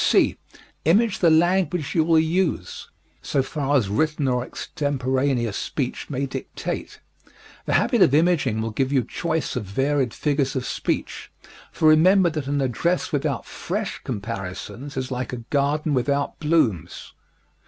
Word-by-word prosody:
(c) -, -, +4 dB, 0.5 s
Image 205 Hz, +6 st, +3 dB
the 170 Hz, -, +5 dB
language 175 Hz, -1 st, +2 dB
you 160 Hz, -, +3 dB
will 165 Hz, 0 st, +3 dB
use, 160 Hz, -, 0 dB, 0.3 s
so 135 Hz, -, 0 dB
far 145 Hz, 0 st, 0 dB
as 115 Hz, -7 st, +1 dB
written 150 Hz, +7 st, 0 dB
or 125 Hz, -1 st, +1 dB
extemporaneous 130 Hz, -5 st, -1 dB
speech 130 Hz, +3 st, -3 dB
may 140 Hz, -1 st, -1 dB
dictate. 135 Hz, -, -5 dB, 0.7 s
The -, -, 0 dB
habit -, -, +2 dB
of 135 Hz, -, +6 dB
imaging 150 Hz, -9 st, +2 dB
will 115 Hz, -, -3 dB
give 130 Hz, +4 st, -1 dB
you 135 Hz, -3 st, +2 dB
choice 160 Hz, +1 st, -2 dB
of 125 Hz, -, -2 dB
varied 135 Hz, +5 st, 0 dB
figures 140 Hz, -1 st, -1 dB
of 130 Hz, -, -2 dB
speech, -, -, -3 dB, 0.4 s
for 160 Hz, -, +2 dB
remember 175 Hz, +3 st, +5 dB
that 155 Hz, -3 st, -4 dB
an 140 Hz, 0 st, 0 dB
address 170 Hz, +8 st, 0 dB
without 145 Hz, -4 st, -1 dB
fresh -, -, -4 dB
comparisons 110 Hz, +6 st, -6 dB
is 130 Hz, 0 st, -3 dB
like 125 Hz, 0 st, -3 dB
a -, -, -3 dB
garden 145 Hz, +2 st, +1 dB
without 140 Hz, +2 st, 0 dB
blooms. 120 Hz, -, 0 dB
140 Hz, 145 wpm, -23 LUFS, 125-160 Hz, 0.7 s, of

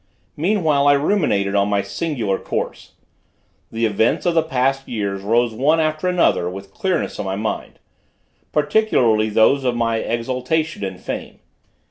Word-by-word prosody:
Meanwhile 155 Hz, -5 st, +2 dB
I 145 Hz, -, +7 dB
ruminated 140 Hz, -, +1 dB
on 100 Hz, 0 st, +2 dB
my 100 Hz, -1 st, +1 dB
singular 100 Hz, -1 st, -2 dB
course. -, -, -5 dB, 0.8 s
The 115 Hz, +1 st, 0 dB
events 110 Hz, +1 st, +1 dB
of 175 Hz, -, +2 dB
the 165 Hz, -, +4 dB
past 135 Hz, -3 st, -1 dB
years 100 Hz, -4 st, -3 dB
rose 115 Hz, +3 st, +1 dB
one 150 Hz, +8 st, +2 dB
after 155 Hz, +2 st, 0 dB
another 175 Hz, -, +2 dB
with 95 Hz, +1 st, -9 dB
clearness 190 Hz, -2 st, -2 dB
in 105 Hz, -, -3 dB
my 95 Hz, 0 st, -2 dB
mind; 110 Hz, +2 st, -4 dB, 0.7 s
particularly 125 Hz, -, +2 dB
those 110 Hz, +6 st, +3 dB
of 125 Hz, -2 st, 0 dB
my 115 Hz, -1 st, 0 dB
exaltation 125 Hz, +6 st, -2 dB
and 95 Hz, -2 st, -5 dB
fame. -, -, -6 dB
120 Hz, 145 wpm, -20 LUFS, 105-155 Hz, 0.8 s, I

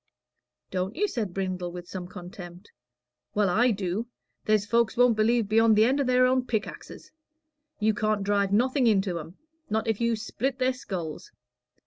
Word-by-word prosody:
"Don't 185 Hz, +2 st, -2 dB
you?" 415 Hz, +6 st, +1 dB
said 220 Hz, -, -3 dB
Brindle, 185 Hz, -1 st, -3 dB
with 175 Hz, 0 st, -8 dB
some 180 Hz, -1 st, -6 dB
contempt. 180 Hz, 0 st, -10 dB, 0.6 s
"Well, 205 Hz, -3 st, +2 dB
I 240 Hz, +7 st, +4 dB
do. 205 Hz, +1 st, -2 dB, 0.4 s
There's 215 Hz, -1 st, +2 dB
folks 235 Hz, +2 st, +1 dB
won't 245 Hz, -2 st, +5 dB
believe 225 Hz, 0 st, +2 dB
beyond 225 Hz, +1 st, +4 dB
the 215 Hz, +1 st, +5 dB
end 270 Hz, +4 st, +2 dB
o' -, -, +2 dB
their 255 Hz, -1 st, +4 dB
own 255 Hz, 0 st, +1 dB
pickaxes. 220 Hz, -3 st, -5 dB, 0.7 s
You 215 Hz, 0 st, +2 dB
can't 215 Hz, -1 st, 0 dB
drive 200 Hz, -1 st, +1 dB
nothing 250 Hz, +4 st, +2 dB
into 195 Hz, -5 st, +1 dB
'em, 165 Hz, +4 st, -10 dB, 0.3 s
not 220 Hz, +1 st, -1 dB
if 225 Hz, 0 st, -1 dB
you 235 Hz, 0 st, +2 dB
split 245 Hz, +4 st, -3 dB
their 255 Hz, -1 st, +1 dB
skulls. 180 Hz, -11 st, -6 dB
215 Hz, 165 wpm, -27 LUFS, 190-235 Hz, 0.7 s, won't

